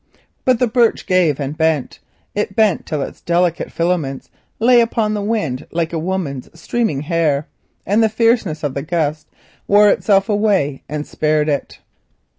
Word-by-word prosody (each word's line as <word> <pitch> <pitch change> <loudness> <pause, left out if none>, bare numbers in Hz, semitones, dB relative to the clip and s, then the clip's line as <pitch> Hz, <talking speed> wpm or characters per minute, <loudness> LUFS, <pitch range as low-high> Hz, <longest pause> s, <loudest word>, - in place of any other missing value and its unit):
But 255 -2 +4
the 250 - +2
birch 235 0 +1
gave 175 -6 +2
and 140 +1 -3
bent; 160 -4 0 0.3
it 205 -1 -2
bent 215 -4 +2
till 150 -3 -2
its - - -9
delicate 175 0 0
filaments 165 -6 -2 0.3
lay 240 +1 +5
upon 225 -2 0
the 210 - -2
wind 200 - -2
like 165 0 -2
a 165 - -1
woman's 160 -7 -3
streaming 215 -7 -1
hair, 150 -2 0 0.4
and 205 +4 +2
the 220 - +3
fierceness 220 -8 +1
of 145 -3 -1
the 140 - -3
blast 155 -1 -2 0.4
wore 205 +1 +6
itself 195 -1 +2
away 205 -10 +1
and 150 0 -4
spared 155 0 0
it. 140 -3 -3
170 Hz, 160 wpm, -18 LUFS, 150-210 Hz, 0.4 s, wore